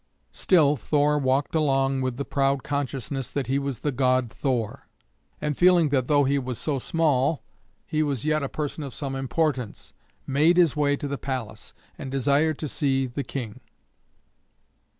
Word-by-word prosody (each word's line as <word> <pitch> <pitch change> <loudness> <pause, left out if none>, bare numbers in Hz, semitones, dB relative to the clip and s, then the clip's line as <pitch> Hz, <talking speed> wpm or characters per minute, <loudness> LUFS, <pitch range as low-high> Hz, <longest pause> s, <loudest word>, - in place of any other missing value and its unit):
Still 150 -6 +3
Thor 150 +2 +1
walked 135 +1 0
along 135 -3 +1
with 130 -2 -2
the 140 - -3
proud 135 -1 0
consciousness 135 -2 -3
that 140 -2 -2
he 135 +3 0
was 140 -5 -4
the 145 - 0
god 130 -2 +1
Thor; 125 -6 -2 0.5
and 150 -1 -2
feeling 175 -2 +5
that 130 -3 +1
though 145 -1 +4
he 140 +1 +1
was 125 -3 -4
so 140 +1 -2
small 150 -1 +1 0.4
he 155 -1 -1
was 145 -4 -1
yet 155 0 +1
a 140 - -3
person 150 0 -4
of 135 -4 -7
some 135 -2 -4
importance, 135 -3 -2 0.3
made 150 +6 +3
his 170 -5 +4
way 145 -1 +2
to 145 - -4
the 140 0 -4
palace, 130 -5 -5 0.2
and 135 - -6
desired 140 +3 +2
to 155 - -4
see 135 -2 0
the 130 +3 -4
King. 120 -5 -6
140 Hz, 170 wpm, -25 LUFS, 130-150 Hz, 0.5 s, feeling